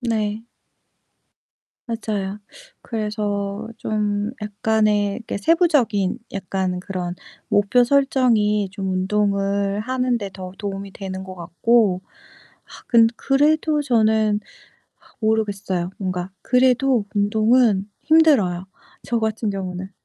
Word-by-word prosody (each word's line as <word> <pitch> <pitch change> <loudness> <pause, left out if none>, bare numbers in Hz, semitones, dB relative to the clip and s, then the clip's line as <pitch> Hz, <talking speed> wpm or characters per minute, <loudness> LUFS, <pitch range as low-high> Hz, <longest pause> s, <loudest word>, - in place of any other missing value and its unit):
네. 220 -2 -2 1.4
맞아요. 210 -3 -3 0.4
그래서 210 -1 -3
좀 210 0 -1
약간의 210 -1 +1
이게 225 - -4
세부적인 245 - +2
약간 190 -2 -2
그런 180 -2 -4 0.3
목표 205 +5 +3
설정이 235 -7 +2
좀 195 -2 -3
운동을 200 +1 0
하는데 245 -3 -1
더 185 -1 -7
도움이 195 -1 -5
되는 190 -1 -6
것 185 -1 -8
같고 185 +3 +2 0.6
아 - - -13
근 230 -2 +6
그래도 300 +2 +2
저는 220 -5 +2 0.6
아 - - -26 0.2
모르겠어요. 200 -5 -1
뭔가 185 -1 -3
그래도 250 -2 +3
운동은 215 0 +3 0.2
힘들어요, 275 - +4 0.4
저 235 - -1
같은 220 0 -1
경우는. 190 -1 -5
210 Hz, 220 characters per minute, -21 LUFS, 195-230 Hz, 1.4 s, 근